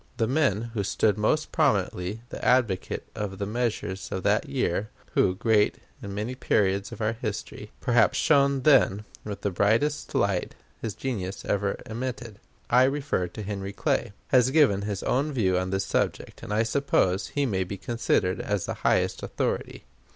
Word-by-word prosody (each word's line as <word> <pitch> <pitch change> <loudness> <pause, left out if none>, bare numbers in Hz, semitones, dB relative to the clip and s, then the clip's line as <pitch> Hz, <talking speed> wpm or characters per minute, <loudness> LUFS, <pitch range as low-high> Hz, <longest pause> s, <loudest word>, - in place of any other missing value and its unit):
The 115 - +2
man 120 -4 +1
who 105 -4 -1
stood 100 +1 +2
most 110 +9 0
prominently 105 - 0
the - - -8
advocate 120 -7 +1
of 100 -2 -4
the 100 - -2
measures 105 -4 -2
of 95 - -3
that - - +1
year, 100 +5 -1 0.2
who, 90 - +2
great 105 +1 +2 0.2
in 100 0 -6
many 110 +5 -3
periods 100 -5 +1
of - - -8
our 110 +1 +1
history, 110 -3 -5
perhaps - - +3
shone 140 -3 +3
then 115 -8 +4 0.2
with 100 -2 -6
the 100 - -1
brightest 115 +11 +1
light 100 -3 0 0.3
his 110 -5 -4
genius 100 -8 -4
ever 100 0 0
emitted 120 -2 -5 0.3
I 125 +2 +5
refer 135 -9 0
to 105 +4 -8
Henry 100 -1 -4
Clay 115 +2 0 0.2
has 130 -1 +5
given 135 -9 +4
his 100 -2 -3
own 140 +4 +1
view 100 -9 +1
on 95 +1 0
this 95 0 -1
subject; - - -2
and - - -7
I 105 +2 +2
suppose 110 -7 +1
he 145 -1 -1
may 95 -7 0
be 100 +2 -6
considered 115 -5 0
as 105 -3 -1
the - - -3
highest - - +1
authority. - - -3
105 Hz, 170 wpm, -26 LUFS, 100-125 Hz, 0.3 s, I